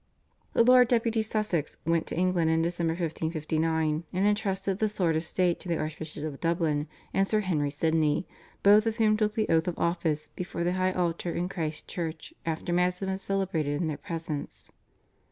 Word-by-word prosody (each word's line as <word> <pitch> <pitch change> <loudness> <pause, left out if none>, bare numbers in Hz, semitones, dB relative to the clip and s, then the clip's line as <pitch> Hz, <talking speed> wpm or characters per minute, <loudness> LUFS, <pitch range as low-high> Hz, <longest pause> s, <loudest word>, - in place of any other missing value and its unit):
The - - +5
Lord 250 0 +7
Deputy 230 -2 +2
Sussex 215 -8 -1
went 165 0 +1
to - - -3
England 180 -2 +2
in 160 0 +2
December 170 -1 0
1559, 160 -1 -1
and 190 +2 +1
entrusted 195 -2 0
the 215 - +2
sword 180 -6 +1
of 160 - 0
state 175 +1 +1
to - - -10
the 170 - +1
Archbishop 155 -1 -5
of 150 -3 -5
Dublin 165 -3 0 0.3
and 195 0 +2
Sir 215 +1 +2
Henry 155 -7 0
Sidney, 160 +2 +1 0.4
both 210 +2 +6
of 225 0 -1
whom 215 -2 +4
took 215 0 0
the 215 -1 +1
oath 160 +1 +2
of 175 - -2
office 165 -3 -1
before 175 -1 -4
the 175 +1 +1
high 185 0 +1
altar 175 -1 -1
in 175 +1 -1
Christ's 160 -5 -4
Church 165 - -5
after 165 +2 -2
Mass 180 +1 +2
had 195 - -3
been 190 - -1
celebrated 175 -8 -1
in 175 - 0
their 155 - -2
presence. 165 -3 -6
170 Hz, 190 wpm, -28 LUFS, 160-195 Hz, 0.4 s, Lord